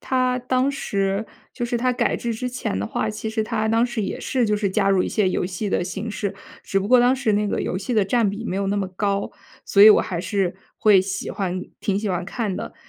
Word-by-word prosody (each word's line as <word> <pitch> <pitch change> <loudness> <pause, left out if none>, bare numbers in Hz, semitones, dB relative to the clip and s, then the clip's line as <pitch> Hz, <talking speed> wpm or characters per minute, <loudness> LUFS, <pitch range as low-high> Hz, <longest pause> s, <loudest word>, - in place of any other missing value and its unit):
它 255 -1 +1
当 255 +2 +1
时 200 -6 -1 0.3
就 240 - -3
是 240 0 -1
它 255 +1 +1
改 245 - 0
制 235 -1 -3
之 250 +3 -3
前 245 - -3
的 100 - -2
话 215 - -2
其 220 +1 -5
实 220 0 -1
它 215 0 -1
当 225 +2 +3
时 240 -3 -3
也 - - -4
是 255 -3 0
就 210 - +1
是 205 -1 0
加 195 0 +2
入 190 -2 +3
一 - - -2
些 205 -4 +1
游 180 - -1
戏 195 +3 -4
的 - - +1
形 210 +5 -5
式。 200 -1 -3 0.3
只 195 - 0
不 195 - -3
过 250 0 +6
当 245 +2 +4
时 230 -5 0
那 205 0 +1
个 - - -1
游 185 - -2
戏 240 +5 -3
的 215 -3 +3
占 225 +1 +2
比 205 +3 -5
没 185 - -3
有 195 - -1
那 205 - 0
么 195 -2 -1
高， 200 +1 -1 0.3
所 200 - +4
以 215 - +11
我 - - +6
还 175 -2 -3
是 185 -1 -1 0.2
会 205 -3 +5
喜 190 +1 -4
欢 185 -2 -3 0.2
挺 195 -1 0
喜 210 0 -2
欢 180 -1 -1
看 205 +1 -3
的。 - - -6
210 Hz, 280 characters per minute, -22 LUFS, 195-235 Hz, 0.3 s, 以